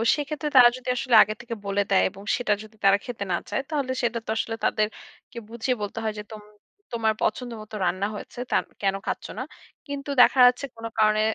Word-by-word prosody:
সেক্ষেত্রে 300 +1 -3
তারা 245 -1 +10
যদি 255 0 -7
আসলে 250 -1 +1
আগে 215 +1 -5
থেকে 235 -1 -6
বলে 200 0 +1
দেয় 195 - +4
এবং 195 +1 -13
সেটা 240 -5 +1
যদি 215 0 -15
তারা 195 0 +6
খেতে 240 -5 -5
না 175 - +2
চায় - - -1
তাহলে 285 -5 -1
সেটা 235 0 0
তো - - -11
আসলে 225 0 -2
তাদেরকে 215 +2 -3
বুঝিয়ে 235 +2 -1
বলতে 205 +2 -4
হয় 220 - -1
যে - - -5
"তোম 215 -1 -8 0.5
তোমার 225 -2 +1
পছন্দ 245 +3 -1
মতো 215 0 -10
রান্না 185 +3 0
হয়েছে 225 - -9
তান - - +3 0.2
কেন 195 -1 +1
খাচ্ছ - - -3
না?" - - -2 0.4
কিন্তু 285 0 -6
দেখা 260 - +5
যাচ্ছে 250 +3 +1
কোন 230 0 -9
কারণে 215 0 +4
225 Hz, 205 wpm, -25 LUFS, 210-250 Hz, 0.5 s, তারা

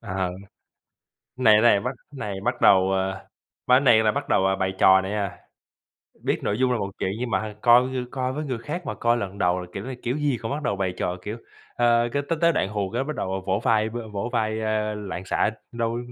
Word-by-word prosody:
Ờ. 95 -1 -2 1.1
Này 110 -4 +5
này 115 -3 +5
bắt 125 +5 -2 0.2
này 105 -7 -4
bắt 120 +1 -1
đầu, 95 0 +5
à, 95 0 -2 0.4
ba 125 - +6
cái - - +6
này 115 -5 +5
là 110 - +3
bắt - - -4
đầu, 95 - +3
à, 95 - +2
bày 95 0 -1
trò 95 0 +6
này 95 +1 -5
nha, 100 -3 -3 0.9
biết - - 0
nội 105 - -1
dung 130 -1 +2
là 120 - 0
một 100 - -3
chuyện, 95 - -1
nhưng 125 0 -3
mà - - +2
h 105 -1 -7
coi 120 +1 +6 0.3
coi 130 -1 -2
với 150 +3 -4
người 130 -5 -3
khác 150 +9 -6
mà - - -3
coi 120 0 +1
lần 100 -4 -5
đầu 90 0 +2
là 90 - -7
kiểu 95 +2 -6
này 130 -1 -6
kiểu 125 +3 -1
gì 145 -5 0
cũng 115 - -3
bắt 145 +2 -3
đầu 100 - -1
bày 95 -2 -2
trò, 90 - -2
kiểu, 105 +4 -5 0.4
ờ, 120 0 +3
cái 140 - 0
tới 165 - 0
tới 170 0 +4
đoạn 95 - 0
hù 100 -2 -3
cái 125 +3 0
bắt 155 +1 -5
đầu, 95 - -3
à, - - -1
vỗ 95 +1 +1
vai 110 -3 +2
v 115 - -8 0.2
vỗ 100 +4 -3
vai, 110 -2 0
a, 110 -1 -1
loạn 95 -3 -6
xạ, 95 - +1 0.2
đâu 115 0 -2
110 Hz, 250 wpm, -24 LUFS, 95-125 Hz, 1.1 s, ba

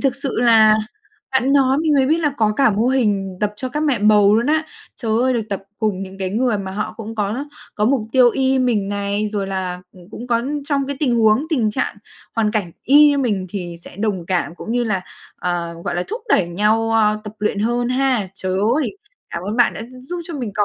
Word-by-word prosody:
thực 270 -2 +1
sự 275 -1 -3
là 220 -3 +6 0.6
bạn 265 +1 +2
nói 270 0 +3
mình 310 -2 +2
mới 265 -2 +3
biết 320 +3 +2
là 295 -4 0
có 215 -2 +2
cả 275 -4 +4
mô 215 +4 +1
hình 205 -8 0
tập 210 0 0
cho 255 - -4
các 295 +4 -3
mẹ 280 -7 +1
bầu 210 -1 +5
luôn 235 +3 +1
á. 315 +1 +2 0.3
Trời 225 -3 -2
ơi, 260 0 +2
được 235 - 0
tập 200 -1 -3 0.2
cùng 210 -4 -1
những 195 0 -9
cái 190 -1 -2
người 230 0 +1
mà 190 -1 -5
họ 210 +1 -4
cũng 225 0 -7
có 220 +6 -2 0.3
có 210 - 0
mục 260 +2 +2
tiêu 250 -2 +6
y 265 +1 +1
mình 225 -6 +1
này, 205 +1 -1
rồi 200 -2 -2
là, 185 -2 -3
ừ, 185 - -16
cũng 240 - -8
có 235 -1 +1 0.2
trong 280 -2 0
cái 280 -1 -4
tình 260 -5 +2
huống, 220 +6 +3
tình 235 -9 +1
trạng 210 - -2 0.4
hoàn 215 -2 +2
cảnh 200 -6 -2
y 295 +3 +7
như 285 -1 +2
mình 205 -8 0
thì 175 -3 -5
sẽ 175 - -12
đồng 200 -5 -2
cảm 175 -4 -1
cũng 225 - -6
như 245 0 +1
là, 210 -4 0 0.4
ờ, 175 -1 -3
gọi - - -2
là, 175 - 0
thúc 450 +3 -5
đẩy 180 - +3
nhau, 215 +5 +1
ơ, 215 -1 +2
tập 210 - -7
luyện 210 -1 -1
hơn 240 +3 0
ha. 255 -6 +1
Trời 190 -2 -3 0.2
ơi! 310 +5 -2 0.3
Cảm 170 - -4
ơn 210 +4 -3
bạn 240 - +3
đã - - -6
gi 250 +2 -12
giúp 345 +6 -5
cho 335 - -7
mình 245 -6 -4
có 205 - +2
220 Hz, 240 wpm, -20 LUFS, 200-260 Hz, 0.6 s, y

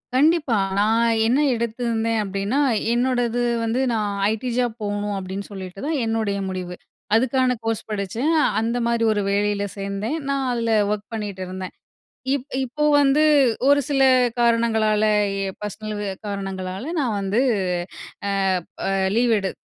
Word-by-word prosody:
கண்டிப்பா 295 -3 +3 0.2
நான் 225 +3 +3 0.2
என்ன 250 +5 +3 0.2
எடுத்திருந்தேன் 230 -1 -1
அப்டின்னா, 200 +6 -1 0.3
என்னோடது 245 -1 +1 0.2
வந்து 230 +3 0
நான் 210 -3 -1 0.2
ஐடி 220 +3 -2
ஜாப் 245 -2 0
போவுணும் 205 0 -2
அப்டின்னு 190 +1 -5
சொல்லிட்டு 190 -1 -8
தான் 310 -2 0
என்னுடைய 220 -3 -1
முடிவு 180 -1 -5 0.4
அதுக்கான 255 +1 +2
கோர்ஸ் 225 -1 -1
படிச்சேன். 215 - -1 0.3
அந்த 230 +2 -1
மாரி 235 -1 +1
ஒரு 210 -1 0
வேலையில 205 0 +1
சேந்தேன். 200 +8 -3
நான் 275 -1 0
அதில 230 -1 -1 0.2
ஒர்க் 210 0 -3
பண்ணிகிட்டு 205 -4 -4
இருந்தேன். 185 0 -6 0.6
இப் 270 -1 -3 0.2
இப்ப 300 +4 -1
வந்து 285 +2 +4 0.5
ஒரு 285 0 +5
சில 270 -2 +2 0.4
காரணங்களால 225 -2 +2 0.4
எ - - -1 0.2
பர்ஸ்னல் 215 +1 -5 0.3
காரணங்களால 195 0 -4 0.2
நான் 235 -7 0
வந்து, 195 +4 0 1.4
அ 195 0 0
லீவ் 240 -1 +3
எடு 195 -1 -2
225 Hz, 130 wpm, -22 LUFS, 200-245 Hz, 1.4 s, ஒரு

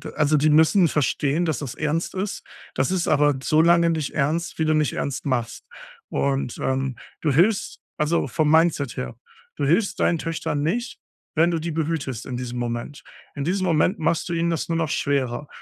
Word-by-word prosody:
also, 150 0 +2
die 150 +1 +3
müssen 160 +4 +5
verstehen, 150 +3 0
dass 155 -6 -1
das 140 -5 -5
ernst 155 +4 -2
ist. 195 +2 -3 0.3
Das 130 +7 0
ist 180 -2 0
aber 145 -2 +3
so 155 +2 +3
lange 170 0 +4
nicht 155 -3 -2
ernst, 160 +5 -1
wie 160 - +2
du 155 - +2
nicht 150 -4 +1
ernst 140 +1 -3
machst, 120 -4 -2 0.5
und, 135 -3 -1
ähm, 130 -1 -1 0.2
du 150 - +1
hilfst 190 +9 +2 0.2
also 155 +2 +1
vom 155 -2 +1
Mindset 160 -5 +2
her, 65 -1 -4 0.4
du 145 - -1
hilfst 185 +8 +1
deinen 170 - +3
Töchtern 155 -2 -3
nicht, 235 +10 -2 0.4
wenn 170 +2 +4
du 165 - -1
die 165 +1 -3
behütest 150 -7 -3
in 125 - -5
diesem 125 -1 -5
Moment. 120 +4 -4 0.3
In 140 - -3
diesem 185 +2 0
Moment 175 +4 +2
machst 160 +2 0
du 170 - -3
ihnen 170 0 0
das 165 - -2
nur 165 - 0
noch 160 -2 -1
schwerer, 140 -1 -1
155 Hz, 190 wpm, -23 LUFS, 140-170 Hz, 0.5 s, müssen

